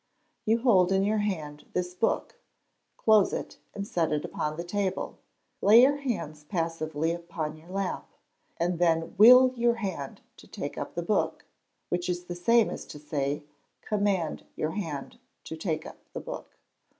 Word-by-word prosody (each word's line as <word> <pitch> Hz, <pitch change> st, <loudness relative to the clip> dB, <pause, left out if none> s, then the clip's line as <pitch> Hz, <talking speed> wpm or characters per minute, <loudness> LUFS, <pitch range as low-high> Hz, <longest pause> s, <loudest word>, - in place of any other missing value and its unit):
You 225 Hz, +2 st, +2 dB
hold 190 Hz, -7 st, +5 dB
in 195 Hz, 0 st, +3 dB
your 215 Hz, +2 st, +1 dB
hand 155 Hz, -8 st, -3 dB
this 180 Hz, 0 st, -1 dB
book: 180 Hz, -, -1 dB, 0.6 s
close 215 Hz, -3 st, +4 dB
it, -, -, -5 dB, 0.2 s
and 200 Hz, -1 st, -4 dB
set 165 Hz, -5 st, 0 dB
it 150 Hz, -1 st, 0 dB
upon 150 Hz, 0 st, -3 dB
the 170 Hz, -, -3 dB
table; 190 Hz, +1 st, -2 dB, 0.4 s
lay 225 Hz, +4 st, +8 dB
your 285 Hz, +2 st, +4 dB
hands 205 Hz, -, -4 dB
passively 165 Hz, -1 st, -1 dB
upon 170 Hz, -2 st, -4 dB
your 160 Hz, +3 st, -16 dB
lap, 195 Hz, 0 st, -3 dB, 0.5 s
and 175 Hz, 0 st, 0 dB
then 165 Hz, -1 st, +2 dB
will 250 Hz, +3 st, +9 dB
your 235 Hz, 0 st, +2 dB
hand, 190 Hz, -11 st, -5 dB, 0.2 s
to -, -, -15 dB
take -, -, -5 dB
up -, -, -6 dB
the -, -, -2 dB
book, -, -, 0 dB, 0.4 s
which 175 Hz, 0 st, -1 dB
is 175 Hz, 0 st, -2 dB
the 180 Hz, -, -5 dB
same 230 Hz, +6 st, +3 dB
as -, -, -7 dB
to -, -, -9 dB
say, 145 Hz, 0 st, -2 dB, 0.4 s
command 200 Hz, -6 st, 0 dB
your 155 Hz, -, -1 dB
hand 180 Hz, -, -5 dB, 0.2 s
to 160 Hz, -, -6 dB
take 160 Hz, -1 st, -2 dB
up -, -, -9 dB, 0.2 s
the -, -, -4 dB
book. -, -, -8 dB
175 Hz, 165 wpm, -28 LUFS, 160-210 Hz, 0.6 s, will